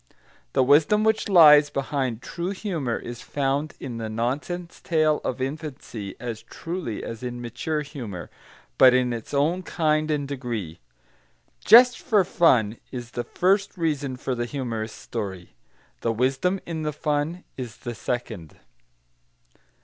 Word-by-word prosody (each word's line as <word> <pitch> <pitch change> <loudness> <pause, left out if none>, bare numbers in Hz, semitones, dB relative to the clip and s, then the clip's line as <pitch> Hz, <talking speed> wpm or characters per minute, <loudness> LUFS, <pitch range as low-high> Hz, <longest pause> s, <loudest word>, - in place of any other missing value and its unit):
The - - +4
wisdom 150 +10 +4
which 220 -1 +1
lies 150 -5 +8
behind 130 -4 -2
true 170 +1 -4
humour 175 - -2
is 120 -1 -8
found 140 +2 -1
in 125 -3 -6
the 110 -1 -4
nonsense 140 +10 -3
tale 155 -2 +2
of 130 - -3
infancy 135 -7 -5
as 115 -2 -5
truly 165 - -5
as 115 -1 -6
in 120 -1 -5
mature 130 +6 -3
humour, 120 - -7 0.5
but 130 -1 +8
in 125 -1 +2
its 115 -2 -7
own 155 +6 +1
kind 155 -3 0
and 145 -2 -1
degree. 115 - -5 0.8
"Just 245 +3 +8
for 210 -4 +3
fun" 120 - +3
is 120 -2 -6
the 120 - -3
first 195 +6 +1
reason 145 -6 -1
for 130 - -3
the 120 -1 -2
humorous 115 -4 -4
story; 95 - -6 0.5
the 115 - 0
wisdom 135 - +1
in 165 -2 -4
the 150 -1 -2
fun 150 +4 -1
is 125 -3 -7
the 120 - -6
second. 110 -7 -5
135 Hz, 140 wpm, -25 LUFS, 120-160 Hz, 0.8 s, lies